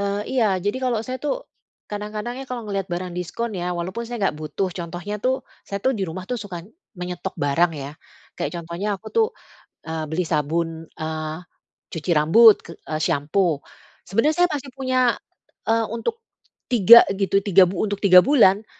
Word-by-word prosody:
eee, 200 0 -1
iya. 240 -3 +3
Jadi, 205 +5 -2
kalau 245 -3 +1
saya 255 0 -3
tuh - - -2 0.4
kadang-kadang 210 +3 -4
ya 270 - -6
kalau 245 -2 -4
ngelihat 195 -2 -3
barang 175 +1 -3
diskon 210 +6 -4
ya, 180 -1 -2
walaupun 185 +7 -4
saya 240 0 -5
enggak 190 - +1
butuh, 155 +5 -2
contohnya 175 +4 -5
tuh 260 +1 +2 0.3
saya 200 - -3
tuh 265 - +3
di 200 - -3
rumah 185 +3 -6
tuh 245 - -1
suka 195 -4 -6 0.4
menyetok 180 0 -5
barang 155 +4 +2
ya. 135 - -6 0.5
Kayak - - -3
contohnya 170 +5 -4
aku 220 - -19
tuh, 455 -1 +4 0.6
eee, 160 -1 -3
beli 175 +3 0
sabun, 165 +2 0 0.3
eee, 155 0 -3 0.6
cuci 165 +2 -5
rambut 210 +9 +7
ke - - -10 0.2
e - - -4
sampo. 150 +1 +1 0.4
Sebenernya 230 - +1
saya 355 - +5
masih 280 -2 -4
punya, 260 -1 -1 0.7
eee, 225 0 +3
untuk 335 - -2 0.6
tiga 235 0 +9
gitu 195 0 +1
tiga 190 -1 +6
untuk 200 +2 -2
tiga 185 -3 +8
bulan. 220 -7 +4
195 Hz, 170 wpm, -22 LUFS, 170-230 Hz, 0.7 s, tiga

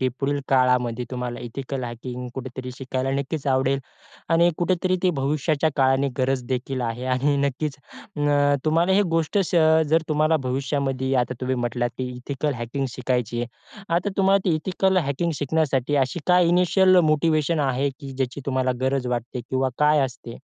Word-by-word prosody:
की 130 - +2
पुढील 140 +1 0
काळामध्ये 125 -2 +2
तुम्हाला 125 -1 -4
एथिकल 130 +2 -5
हॅकिंग 125 +1 -6
कुठेतरी 130 -1 -6
शिकायला 130 0 -2
नक्कीच 140 +1 -3
आवडेल 135 0 +2 0.5
आणि 170 +1 +4
कुठेतरी 185 +1 +1
ते 185 - +4
भविष्याच्या 150 +2 +1
काळाने 135 0 +3
गरज 130 0 +1
देखील 130 +1 -2
आहे 120 +2 -3
आणि 140 +3 +1
नक्कीच 140 +1 -1 0.4
उम्म, 145 -1 +3
तुम्हाला 165 +4 +2
ही 200 - +4
गोष्ट 165 +5 0
अ, 195 - +4 0.5
जर 160 +2 +3
तुम्हाला 155 +1 +2
भविष्यामध्ये 135 0 -1
आता 125 +1 -4
तुम्ही 130 0 -1
म्हटलात 120 0 -1
की 130 - -2
एथिकल 140 +3 -3
हॅकिंग 125 +3 -3
शिकायची 125 -2 -2
आहे. 125 - -12
आता 175 +4 +1
तुम्हाला 195 0 +4
ती 175 -4 +2
एथिकल 190 +4 0
हॅकिंग 165 0 0
शिकण्यासाठी 145 -2 0
अशी 130 +6 -6
काय 180 -1 +5
इनिशिअल 180 +2 +4
मोटिव्हेशन 155 +1 +2
आहे 135 +2 0
की 135 -2 -7
ज्याची 130 +1 -3
तुम्हाला 130 -1 +1
गरज 130 -1 0
वाटते 120 +1 -5
किंवा 130 0 +1
काय 150 0 +4
असते? 125 -2 -8
135 Hz, 160 wpm, -23 LUFS, 130-155 Hz, 0.5 s, काय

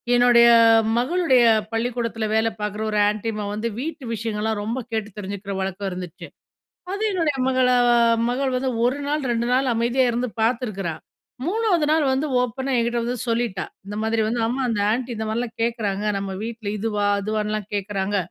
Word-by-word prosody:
என்னுடைய 240 -1 +6 0.3
அ - - +6 0.2
மகளுடைய 260 -1 +3 0.3
பள்ளிக்கூடத்துல 230 -1 -2
வேலை 220 +1 +3
பார்க்குற 210 +1 -3
ஒரு 210 - 0
ஆன்டி 215 +2 -3
அம்மா 210 -1 -4
வந்து 215 +2 -2
வீட்டு 300 0 -5
விஷயங்கள்லாம் 220 -1 -2
ரொம்ப 230 +5 -2
கேட்டு 220 -1 -2
தெரிஞ்சுக்கிற 200 0 -5
வழக்கம் 195 +1 -3
இருந்துச்சு. 180 -1 -7 0.7
அது 405 +2 -3
என்னுடைய 325 -6 0
மகள 255 -1 +3 0.3
ஆ - - +5 0.3
மகள் 260 +1 -1
வந்து 260 +1 -1
1 255 +3 +1
நாள், 300 +1 0
2 235 0 -1
நாள் 260 0 +2
அமைதியா 240 +3 +2
இருந்து 245 +1 -1
பார்த்துக்கிறா. 215 -7 -1 0.5
3 375 -5 +1
நாள் 315 -1 +3
வந்து 270 +4 0
ஓப்பனா 260 +2 -2
என்கிட்ட 235 0 0
வந்து 245 0 -2
சொல்லிட்டா. 230 -5 -1 0.2
இந்த 205 - -6
மாதிரி 225 0 0
வந்து 235 +1 -1
அம்மா 255 +3 -1
அந்த 215 -3 0
ஆன்டி 250 +1 -2
இந்த 220 - -3
மாரிலாம் 230 +1 -3
கேட்குறாங்க, 210 -4 -1
நம்ம 195 0 -3
வீட்ல 225 -2 -5
இதுவா, 210 -1 -1 0.2
அதுவான்னுலாம் 215 0 -2
கேட்கறாங்க. 200 0 -2
230 Hz, 165 wpm, -23 LUFS, 210-250 Hz, 0.7 s, என்னுடைய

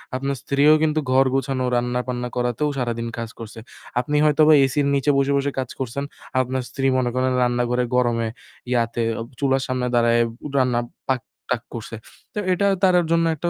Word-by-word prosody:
আপনার 135 +1 -2
স্ত্রীও 145 +2 +4
কিন্তু 155 0 +2
ঘর 135 +1 +5
গোছানো, 135 -1 -1
রান্নাবান্না 125 0 -2
করাতেও 125 +4 0
সারাদিন 115 -2 -2
কাজ 115 -1 -4
করছে। 115 0 -9 0.4
আপনি 145 +4 -2
হয়তোবা 155 +1 +5
এসির 140 +1 0
নিচে 140 +2 +2
বসে, 140 +1 +2
বসে 140 0 0
কাজ 130 - -3
করছেন। 130 +2 -3 0.4
আপনার 130 +1 -2
স্ত্রী 135 -1 -3
মনে 125 -1 +1
করেন 130 0 +1
রান্নাঘরে 125 0 +1
গরমে 120 -2 +1 0.4
ইয়াতে 115 -1 0 0.2
অব 115 - -5
চুলার 135 -1 +2
সামনে 130 -1 -1
দাঁড়ায় 120 0 +4 0.4
রান্না 125 -2 +2 0.3
পাক-টাক 125 -1 -3
করছে। 115 0 -6 0.4
তো - - -3
এটা 200 +3 0 0.2
তার 185 -1 +5 0.2
জন্য 165 0 +3
একটা 170 +3 -2
130 Hz, 165 wpm, -22 LUFS, 120-140 Hz, 0.4 s, ঘর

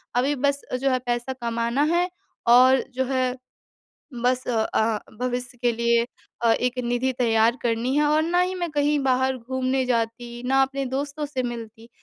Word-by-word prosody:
अभी 270 +4 +2
बस 280 +1 0 0.2
जो 275 - +2
है 255 - +1
पैसा 240 +2 -1
कमाना 235 +3 0
है 355 +1 +2 0.4
और 255 +2 +6
जो 260 +1 0
है, 255 -1 0 0.9
बस 255 +1 +1
अ 235 -2 +1
अ, 220 -1 +1 0.2
भविष्य 250 0 -3
के 240 -1 +3
लिए 235 0 +2 0.4
अ, 230 - +5
एक 250 +1 -1
निधि 245 +2 0
तैयार 230 0 +3
करनी 240 +2 0
है 300 - +3
और 305 +1 +3
ना 345 +2 +1
ही 365 +1 -1
मैं 350 -2 -2
कहीं 295 0 +1
बाहर 260 0 +1
घूमने 260 +2 -1
जाती, 240 0 -2
ना 270 +1 +4
अपने 270 0 -3
दोस्तों 285 +2 -3
से 265 -3 -3
मिलती, 230 -1 -7
255 Hz, 175 wpm, -24 LUFS, 235-270 Hz, 0.9 s, और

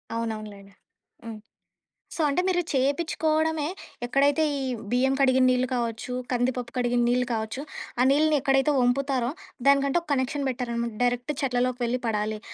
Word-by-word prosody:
అవునవునులెండి. 215 -3 -5 0.5
హ్మ్. 225 -2 -7 0.8
సో, 330 - -2
అంటే 290 +5 +1
మీరు 355 -1 +2
చేపిచ్చుకోవడమే 310 +2 +1 0.4
ఎక్కడైతే 285 +5 +2 0.2
ఈ - - -3 0.3
బియ్యం 260 +2 +2
కడిగిన 260 -1 +4
నీళ్ళు 255 0 +2
కావచ్చు, 235 0 -3 0.2
కందిపప్పు 245 0 -1
కడిగిన 245 -1 +1
నీళ్ళు 250 0 +2
కావచ్చు, 220 +4 -3 0.4
ఆ - - +5
నీళ్ళని 305 +1 +3
ఎక్కడైతే 270 +1 +3
ఒంపుతారో, 255 -1 +1 0.4
దానికంటూ 280 +3 +4
ఒక 335 - -24
కనెక్షన్ 275 +1 -1
పెట్టారనమాట. 235 -2 -3
డైరెక్ట్ 245 +3 0
చెట్లలోకి 250 -1 0
వెళ్లి 245 +2 -1
పడాలి. 215 0 -1
255 Hz, 135 wpm, -26 LUFS, 240-280 Hz, 0.8 s, ఆ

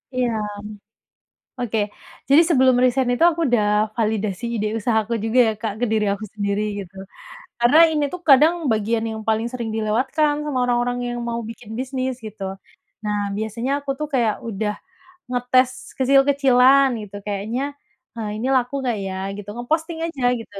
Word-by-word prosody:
Iya. 250 -1 +1 1.3
Oke, 225 -2 -1 0.5
jadi 295 +5 +7
sebelum 260 -4 +5
resign 255 0 +2
itu 285 +7 +2
aku 335 +1 -5
udah 235 -4 +2 0.3
validasi 215 -1 -1
ide 215 -1 -1
usaha 220 +1 +1
aku 235 +2 -3
juga 225 +3 +1
ya - - +1 0.3
ke - - +2
diri 215 -1 +1
aku 215 +2 -7
sendiri 205 0 -1 1.0
karena 240 +6 +5
ini 300 -2 0
tuh 360 - -6
kadang 300 +5 +7 0.2
bagian 220 +1 0
yang 220 0 -5
paling 220 +1 +1
sering 235 -3 -4
dilewatkan 255 +8 +1
sama 285 -4 -2
orang-orang 245 0 0
yang 240 0 -3
mau 235 0 -2
bikin 225 -1 -11
bisnis 260 0 -2
gitu. 210 -2 -8 0.6
Nah, 210 0 -1 0.2
biasanya 230 +4 -3
aku 285 -1 -10
tuh 300 - -2
kaya 235 -4 +3 0.2
udah 210 0 -2 0.6
ngetes 250 +1 +2 0.3
kecil-kecilan 270 0 +5
gitu 205 -1 -10
kayaknya, 210 +5 -3 0.5
eee, 220 -2 -4
ini 250 - -2
laku 250 +1 +1
gak 230 -3 0
ya 190 - -4 0.2
gitu 205 0 -8
ngeposting 320 +7 -2
aja 285 -6 -5 0.2
gitu. 215 -2 -12
240 Hz, 155 wpm, -22 LUFS, 220-265 Hz, 1.3 s, jadi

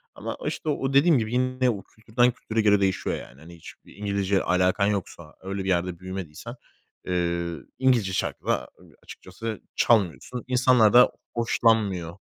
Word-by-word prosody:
Ama, - - -6
işte, 155 - -3
o 135 -2 -1
dediğim 145 +1 +5
gibi 110 0 -2
yine 130 0 +1
o 100 -4 -3
kültürden 120 +3 0
kültüre 110 -1 -2
göre 105 -1 +4
değişiyor, 95 -1 0
yani. 65 - -11
Hani, 85 +2 -13
hiçbir 80 - -15
İngilizce 100 -1 0
alakan 90 +2 +2
yoksa 90 -6 -4
öyle 95 +1 -4
bir 95 - -3
yerde 90 -1 -1
büyümediysen, 95 - -7 0.5
eee, 85 -1 -1 0.2
İngilizce 120 -8 +2
şarkı - - -3
da 65 - -1 0.3
açıkçası 115 -2 -8
çalmıyorsun. 105 - +1
İnsanlar 125 -4 +4
da 125 +1 +7 0.2
hoşlanmıyor. 105 -7 +1
100 Hz, 145 wpm, -25 LUFS, 90-120 Hz, 0.5 s, da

